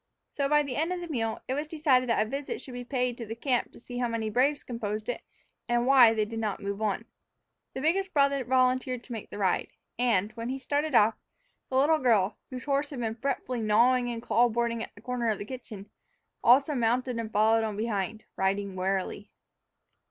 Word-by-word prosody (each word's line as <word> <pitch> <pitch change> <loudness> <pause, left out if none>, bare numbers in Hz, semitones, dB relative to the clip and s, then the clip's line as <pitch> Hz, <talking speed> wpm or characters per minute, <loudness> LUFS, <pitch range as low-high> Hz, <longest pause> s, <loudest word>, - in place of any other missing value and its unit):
So, 280 -1 -1
by 295 0 +4
the 265 -4 -4
end 320 +4 0
of 365 - -2
the 350 - -6
meal, 225 -8 -2
it 260 - -1
was 295 +3 -2
decided 285 -6 +2
that 220 -2 +3
a - - -9
visit 275 +4 -4
should 255 - -10
be 245 0 -5
paid 250 -1 -1
the 225 -1 -5
camp 250 +1 0
to - - -15
see 245 +1 -7
how 245 - +1
many 225 -2 -2
braves 275 +6 +2
composed 215 -3 -4
it, 245 - -3 0.5
and 240 0 +2
why 255 -4 +7
they 215 -1 +1
did 225 +1 -5
not 215 -3 -2
move 200 0 -4
on. 215 +1 -1 0.7
The 265 - -3
biggest 380 +6 +1
brother 280 -3 +2
volunteered 255 0 +1
to - - -13
make 225 -3 -6
the - - -8
ride, 190 -3 +1 0.3
and, 215 -4 +2
when 230 +1 -5
he 265 - -2
started 285 +2 -1
off, 220 0 +6 0.6
the 260 - -3
little 310 +4 +4
girl, 220 -7 +2
whose 255 -1 -6
horse 285 +1 0
had 275 - -6
been 225 -2 -1
fretfully 250 0 -3
gnawing 240 +4 +4
the 240 -1 -3
clapboarding 235 0 +1
at - - -7
the 205 - -15
corner 245 -1 -1
of 215 - 0
the 205 - -6
kitchen, 220 -5 -9 0.5
also 275 +5 +5
mounted 245 0 0
and 225 -1 -4
followed 220 +2 +3
on 215 -2 -3
behind, 215 -1 -2
riding 195 0 0
warily. 190 +2 -2
240 Hz, 210 wpm, -28 LUFS, 220-265 Hz, 0.7 s, why